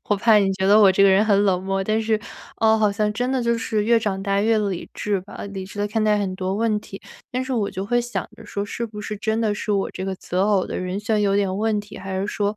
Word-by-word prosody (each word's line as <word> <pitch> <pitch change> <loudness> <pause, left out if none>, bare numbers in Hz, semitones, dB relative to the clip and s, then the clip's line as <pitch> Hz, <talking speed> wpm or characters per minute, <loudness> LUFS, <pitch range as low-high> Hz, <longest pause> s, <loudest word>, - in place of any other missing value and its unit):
我 205 - +3
怕 220 +1 +4
你 195 -2 +3
觉 190 0 -1
得 205 +2 +6
我 195 -2 +7
这 195 - +3
个 200 - +7
人 195 +3 +4
很 205 -2 +3
冷 185 -2 +2
漠， 195 0 -1
但 215 +3 0
是， 220 -1 0 0.4
呃， 220 0 +4
好 210 -2 +3
像 210 +1 0
真 245 +4 -1
的 260 -2 0
就 235 0 +1
是 220 -2 -1
越 230 +1 +4
长 195 -3 -2
大 200 0 +1
越 220 +1 +3
理 200 -4 -3
智 205 -2 -1
吧， 200 - -10
理 195 -1 -5
智 205 - -11
地 205 - 0
看 220 +1 -1
待 210 -1 +3
很 195 -2 -2
多 190 +1 -2
问 215 -1 +1
题。 195 - -10 0.3
但 255 +1 -1
是 265 - -4
我 215 -5 0
就 190 - -4
会 240 +3 +1
想 240 0 -4
着 - - -13
说 200 0 -3
是 235 +3 -4
不 210 -1 -9
是 210 0 -5
真 220 +2 -1
的 215 -2 +1
是 210 0 -2
我 195 -1 0
这 190 - -6
个 195 - -2
择 180 +1 -2
偶 200 -3 +2
的 - - -5
人 185 +2 -3
选 210 0 0
有 200 -1 +2
点 195 -2 +1
问 215 -1 +1
题， 205 -1 -11
还 190 0 -4
是 195 - -2
说， 205 0 -1
205 Hz, 315 characters per minute, -22 LUFS, 195-220 Hz, 0.4 s, 我